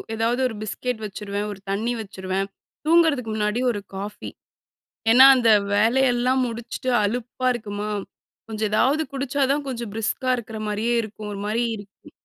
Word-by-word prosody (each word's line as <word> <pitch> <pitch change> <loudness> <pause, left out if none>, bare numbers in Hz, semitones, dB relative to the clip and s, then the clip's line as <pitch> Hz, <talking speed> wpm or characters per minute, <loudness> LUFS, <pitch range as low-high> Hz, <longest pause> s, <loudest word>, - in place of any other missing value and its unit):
ஏதாது 230 +3 0
ஒரு 230 - -6
பிஸ்கெட் 220 +2 -3
வச்சுருவேன, 205 0 -4
ஒரு 195 - -12
தண்ணி 225 +5 0
வச்சுருவேன். 190 -1 -3 0.4
தூங்குறதுக்கு 310 -8 +3
முன்னாடி 210 +2 0
ஒரு 205 - -3 0.2
காஃபி. 205 +2 -6 0.8
ஏன்னா 255 +3 +9
அந்த 240 -3 +3 0.2
வேலையெல்லாம் 250 +3 +3
முடிச்சுட்டு 235 +2 -5
அலுப்பா 245 +4 -2
இருக்குமா 210 -2 -4 0.6
கொஞ்ச 220 -1 -6
எதாது 270 +8 +3
குடிச்சா 275 +1 -2
தான் 290 +1 0
கொஞ்ச 245 -3 -4
பிரிஸ்கா 225 +4 -1
இருக்கிற 225 -2 -7
மாரியே 220 +3 0
இருக்கும். 210 -1 -7
ஒரு 200 - -6
மாரி 225 +3 0
இருக்கும். 205 -1 -14
225 Hz, 140 wpm, -23 LUFS, 210-250 Hz, 0.8 s, ஏன்னா